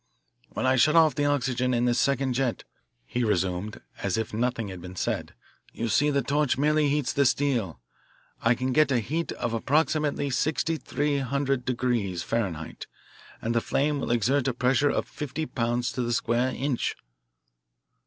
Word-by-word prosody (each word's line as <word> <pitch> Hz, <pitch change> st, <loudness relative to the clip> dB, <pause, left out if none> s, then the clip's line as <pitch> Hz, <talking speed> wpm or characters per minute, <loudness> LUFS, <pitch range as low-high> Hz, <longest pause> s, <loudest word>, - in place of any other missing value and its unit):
"When -, -, -3 dB
I 130 Hz, 0 st, +3 dB
shut 150 Hz, +6 st, +4 dB
off 160 Hz, -2 st, +6 dB
the 145 Hz, -, 0 dB
oxygen 130 Hz, -3 st, +1 dB
in 120 Hz, +1 st, +1 dB
this 120 Hz, 0 st, +2 dB
second 135 Hz, -1 st, +1 dB
jet," 125 Hz, -2 st, -1 dB, 0.4 s
he 120 Hz, -, -2 dB
resumed 95 Hz, -1 st, -1 dB, 0.2 s
as 95 Hz, 0 st, 0 dB
if 110 Hz, -1 st, -3 dB
nothing 115 Hz, -1 st, -1 dB
had 95 Hz, -2 st, -8 dB
been 90 Hz, +1 st, -9 dB
said, -, -, -3 dB, 0.4 s
"you 115 Hz, -, -3 dB
see 145 Hz, +8 st, +3 dB
the 140 Hz, -2 st, +1 dB
torch 145 Hz, +1 st, +1 dB
merely 150 Hz, +1 st, +3 dB
heats 145 Hz, -2 st, 0 dB
the 140 Hz, -, +3 dB
steel. 120 Hz, -, 0 dB, 0.6 s
I 115 Hz, +1 st, +3 dB
can 130 Hz, +2 st, -1 dB
get 155 Hz, 0 st, +4 dB
a 130 Hz, -, +3 dB
heat 155 Hz, +9 st, -2 dB
of 120 Hz, -, -3 dB
approximately 145 Hz, +3 st, +1 dB
sixty 155 Hz, +5 st, 0 dB
three 145 Hz, +1 st, -1 dB
hundred 135 Hz, -1 st, -1 dB
degrees 120 Hz, -8 st, -1 dB
Fahrenheit, 90 Hz, -9 st, -3 dB, 0.6 s
and 115 Hz, -, 0 dB
the 115 Hz, -, +2 dB
flame 145 Hz, +4 st, 0 dB
will -, -, -3 dB
exert 120 Hz, +4 st, +2 dB
a 130 Hz, -, 0 dB
pressure 130 Hz, +4 st, +2 dB
of -, -, -1 dB
fifty 150 Hz, +1 st, -4 dB
pounds 120 Hz, -2 st, -1 dB
to 125 Hz, -, -3 dB
the 120 Hz, 0 st, -1 dB
square 120 Hz, +2 st, +1 dB
inch." 135 Hz, -2 st, -1 dB
125 Hz, 175 wpm, -26 LUFS, 115-145 Hz, 0.6 s, off